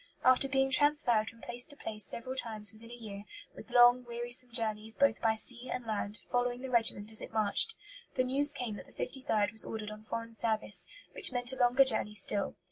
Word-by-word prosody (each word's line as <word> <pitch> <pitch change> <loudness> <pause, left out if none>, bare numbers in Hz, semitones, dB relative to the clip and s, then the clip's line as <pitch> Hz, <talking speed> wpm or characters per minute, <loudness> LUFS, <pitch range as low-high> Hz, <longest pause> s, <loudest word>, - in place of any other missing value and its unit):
After 255 +1 +4
being 270 0 +1
transferred 260 -6 +3
from 230 - -17
place 240 +1 0
to 290 - -2
place 215 -5 -4
several 235 +6 -5
times 215 -4 -1
within 225 +1 -15
a 240 - -9
year, 205 -4 -9 0.3
with - - -12
long, 245 0 +5
wearisome 240 +1 -1
journeys 220 -1 -1
both 280 -5 +1
by 220 -1 +1
sea 245 +3 +3
and 250 -1 -5
land, 210 -1 -4
following 245 0 -1
the 260 -1 -7
regiment 225 -3 +1
as 220 - 0
it - - -9
marched, 220 - +2 0.4
the 255 - +1
news 275 +3 +5
came 225 -4 -4
that - - -12
the - - -20
53rd 225 -6 -2
was 220 - -3
ordered 215 -1 -6
on 215 0 -10
foreign 230 +1 -6
service, 215 -5 0 0.3
which - - -2
meant 245 0 -2
a - - -6
longer 250 +1 +4
journey 220 -4 0
still. 200 0 +2
235 Hz, 210 wpm, -31 LUFS, 215-255 Hz, 0.4 s, long